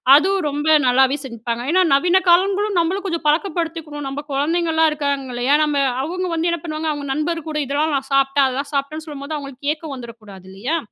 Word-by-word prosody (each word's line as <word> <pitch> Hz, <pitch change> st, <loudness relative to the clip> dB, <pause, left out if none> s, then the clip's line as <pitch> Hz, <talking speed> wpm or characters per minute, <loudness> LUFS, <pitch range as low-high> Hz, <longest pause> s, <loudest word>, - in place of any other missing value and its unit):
அதுவும் 380 Hz, +5 st, +3 dB
ரொம்ப 295 Hz, +2 st, -3 dB, 0.2 s
நல்லாவே 265 Hz, +2 st, +4 dB
செஞ்சுப்பங்க. 235 Hz, 0 st, -5 dB
ஏனா, 370 Hz, -, +5 dB
நவீன 355 Hz, +6 st, +4 dB
காலங்களும், 395 Hz, +3 st, +3 dB
நம்மளும் 370 Hz, +4 st, -1 dB
கொஞ்சம் 335 Hz, -3 st, -3 dB
பழக்கப்படுத்திக்கினும். 320 Hz, -3 st, -1 dB
நம்ப 285 Hz, +2 st, -5 dB
குழந்தைகள்லா 320 Hz, +3 st, +2 dB
இருக்காங்கல்லயா? 275 Hz, -3 st, 0 dB
நம்ம 285 Hz, -2 st, +1 dB, 0.2 s
அவுங்க 365 Hz, +5 st, -3 dB
வந்து 335 Hz, +1 st, 0 dB
என்ன 340 Hz, -, -1 dB
பண்ணுவாங்க? 310 Hz, 0 st, -2 dB
அவுங்க 285 Hz, -1 st, -6 dB
நண்பர் 310 Hz, +2 st, -2 dB
கூட, 305 Hz, -, -3 dB
இதெல்லாம் 290 Hz, +2 st, 0 dB
நான் 270 Hz, +1 st, -7 dB
சாப்பட்டேன், 275 Hz, 0 st, +3 dB
அதெல்லாம் 275 Hz, +3 st, -4 dB
சாப்பட்டேன்னு 305 Hz, +3 st, -3 dB
சொல்லும்போது, 290 Hz, +1 st, -6 dB
அவுங்களுக்கு 280 Hz, +1 st, -4 dB
ஏக்கம் 310 Hz, -3 st, -8 dB
வந்துடக்கூடாது 215 Hz, -6 st, -11 dB
இல்லையா? 240 Hz, +13 st, -2 dB
295 Hz, 170 wpm, -20 LUFS, 275-330 Hz, 0.2 s, ஏனா